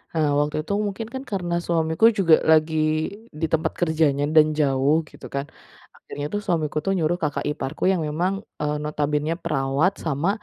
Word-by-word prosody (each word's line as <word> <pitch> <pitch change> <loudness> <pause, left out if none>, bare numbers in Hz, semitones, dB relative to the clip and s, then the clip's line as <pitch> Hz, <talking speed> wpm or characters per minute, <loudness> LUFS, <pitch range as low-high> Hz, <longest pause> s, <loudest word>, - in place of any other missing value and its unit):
Eee, 155 -2 +2
waktu 150 0 0
itu 165 - -7 0.2
mungkin 205 +3 -5
kan 265 +1 -5
karena 175 -3 -1
suamiku 165 +3 +1
juga 170 -4 +6 0.2
lagi 160 0 +3 0.7
di - - +2
tempat 160 0 +1
kerjanya 155 -4 +2
dan 155 -1 +5
jauh 145 +2 +2
gitu - - -13
kan. 140 0 -1 0.5
Akhirnya 145 - -7
tuh 205 - 0
suamiku 155 -3 -1
tuh 195 - +1
nyuruh 175 +1 0
kakak 150 -4 -2
iparku 150 0 -5
yang 185 - 0
memang, 170 +6 0 0.3
eee, 150 0 0
notabenenya 150 +1 -1
perawat 150 +3 +1
sama 160 +2 -1
155 Hz, 165 wpm, -23 LUFS, 150-170 Hz, 0.7 s, juga